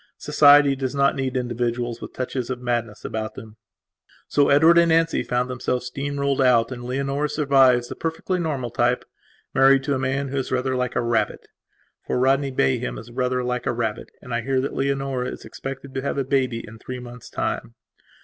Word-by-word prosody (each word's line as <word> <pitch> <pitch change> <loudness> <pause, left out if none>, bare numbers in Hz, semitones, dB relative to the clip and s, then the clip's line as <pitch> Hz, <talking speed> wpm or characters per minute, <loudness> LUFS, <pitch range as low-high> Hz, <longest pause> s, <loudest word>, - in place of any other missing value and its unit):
Society 145 -1 +5
does 130 0 -3
not 140 0 +3
need 130 -1 -2
individuals 120 -1 -2
with - - -7
touches 130 -1 -3
of 130 -1 -3
madness 120 -3 -3
about 110 0 -4
them. 110 -1 -11 0.7
So 145 -1 +3
Edward 160 +4 +6
and 170 0 +4
Nancy 165 0 +3
found 125 +1 -1
themselves 125 0 -2
steamrolled 140 -1 -1
out 120 -2 +4
and 120 -1 -6
Leonora 140 +3 -1
survives, 135 -5 +4
the - - -7
perfectly 165 +3 -2
normal 140 -8 -2
type, 120 +1 +1 0.5
married 135 0 +5
to 140 0 0
a 130 - -1
man 135 +1 -1
who 140 - -3
is 135 - -2
rather 130 0 0
like 125 0 -2
a - - +2
rabbit. 115 -1 -1 0.6
For - - 0
Rodney 135 +2 +2
Bayham 65 - 0
is 120 - -10
rather 125 0 -1
like 125 0 -2
a - - +1
rabbit, 115 -2 -3
and 125 - -7
I 120 - 0
hear 130 +2 0
that 140 - -3
Leonora 135 -2 -1
is - - -7
expected 135 0 -7
to 135 - -2
have 140 - -2
a 140 - +1
baby 130 -3 0
in 110 +1 -12
three 125 +2 -6
months' 125 -1 -10
time. 115 - -3
130 Hz, 195 wpm, -23 LUFS, 120-140 Hz, 0.7 s, Edward